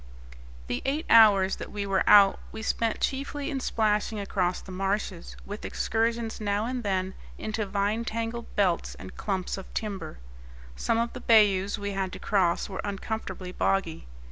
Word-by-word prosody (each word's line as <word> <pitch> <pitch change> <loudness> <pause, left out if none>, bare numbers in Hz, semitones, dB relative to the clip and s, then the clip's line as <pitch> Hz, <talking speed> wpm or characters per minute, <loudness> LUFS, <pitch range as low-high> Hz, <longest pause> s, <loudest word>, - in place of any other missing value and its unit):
The 120 - -3
eight 290 +4 -1
hours 200 -4 +7
that - - -7
we 205 -1 -3
were 195 -1 +1
out 200 -2 +7
we 220 - -7
spent 225 0 0
chiefly 280 +2 -2
in 275 - -2
splashing 215 -3 0
across 185 -3 -1
the 190 - -11
marshes, 195 -1 -3
with 205 +1 -7
excursions 225 0 -1
now 205 +1 0
and 250 +1 -2
then 190 -3 -1 0.2
into 215 -1 -3
vine 205 +3 0
tangled 230 +1 -3
belts 185 -4 +1
and - - -10
clumps 190 -1 -2
of 190 - -11
timber. 205 - -4 0.6
Some 225 - 0
of 235 +1 -1
the - - -7
bayous 205 -3 +4
we 205 0 -3
had 195 -1 -2
to - - -6
cross 185 -5 +1
were 190 -2 -5
uncomfortably 200 -2 -4
boggy. 180 - -1
205 Hz, 165 wpm, -27 LUFS, 195-225 Hz, 0.6 s, hours